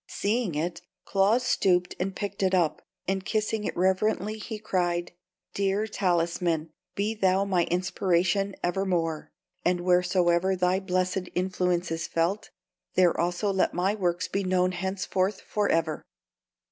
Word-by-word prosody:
Seeing 210 -5 -1
it, 170 +3 -2 0.2
Claus 205 +5 +3
stooped 180 -6 +2
and 190 +1 -2
picked 200 -1 -4
it 190 -1 +3
up, 170 -4 +1 0.3
and 190 0 0
kissing 215 +1 -1
it - - -3
reverently, 195 +3 +1
he 220 +1 -5
cried: 175 -4 -1 0.4
"Dear 200 +2 0
talisman, 170 -5 0 0.2
be 205 +2 0
thou 195 -2 +2
my 180 -4 +2
inspiration 185 +2 +1
evermore; 175 -4 -1 0.3
and 180 0 +1
wheresoever 180 0 +3
thy 180 +1 +2
blessed 185 -1 -1
influence 180 -1 0
is 165 0 -2
felt, 170 +5 -1 0.5
there 180 -2 +4
also 175 +4 0
let 190 - +1
my 185 +3 +1
works 180 -3 -1
be 195 - -2
known 185 0 +2
henceforth 190 +1 -1
forever!" 165 -7 0
185 Hz, 135 wpm, -27 LUFS, 175-195 Hz, 0.5 s, there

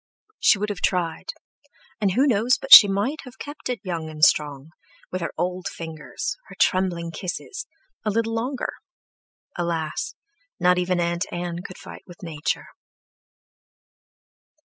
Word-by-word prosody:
She 215 - +5
would 210 +2 -2
have 200 -3 -5
tried, 175 - -1 0.7
and 200 -3 +1
who 260 +7 +3
knows 245 -1 +3
but 270 +1 +4
she 205 - +13
might 205 +11 -1
have 255 -1 -13
kept 290 -2 -7
it 245 -3 -2
young 170 -4 -4
and 155 0 +4
strong, 145 0 +1 0.4
with 185 - -3
her 170 - -2
old 180 +2 -2
fingers, 160 - -5
her - - -12
trembling 175 -3 +1
kisses—a 325 - -7
little 225 +2 0
longer; 245 +4 -2 0.8
alas! 170 - -2 0.4
not 180 0 +4
even 180 0 0
Aunt 170 +2 0
Ann 175 -1 -4
could 185 -1 -10
fight - - -11
with 175 0 -14
Nature. 155 -4 -3
185 Hz, 140 wpm, -24 LUFS, 170-230 Hz, 0.8 s, she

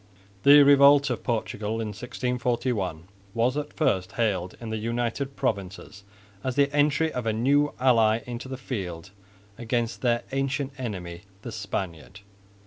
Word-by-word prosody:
The 145 +3 +8
revolt 140 0 +6
of 120 - -4
Portugal 110 -2 -2
in 110 -1 -3
1641 120 -5 -2 0.3
was 120 +3 +1
at 150 0 -3
first 95 - 0
hailed 95 -6 -1
in 115 -2 -6
the 110 - -2
United 120 +4 -2
Provinces 100 0 -4 0.4
as 130 -1 -2
the 140 0 +2
entry 150 +2 +2
of 125 -2 -3
a 110 - +1
new 140 +6 +2
ally 115 -3 +4
into 120 +1 -6
the 130 0 -6
field 95 -8 -6 0.5
against 120 0 -2
their 120 -2 +1
ancient 135 0 -1
enemy 90 -8 -5 0.2
the 120 - -6
Spaniard. 95 -3 -5
120 Hz, 140 wpm, -26 LUFS, 105-135 Hz, 0.5 s, The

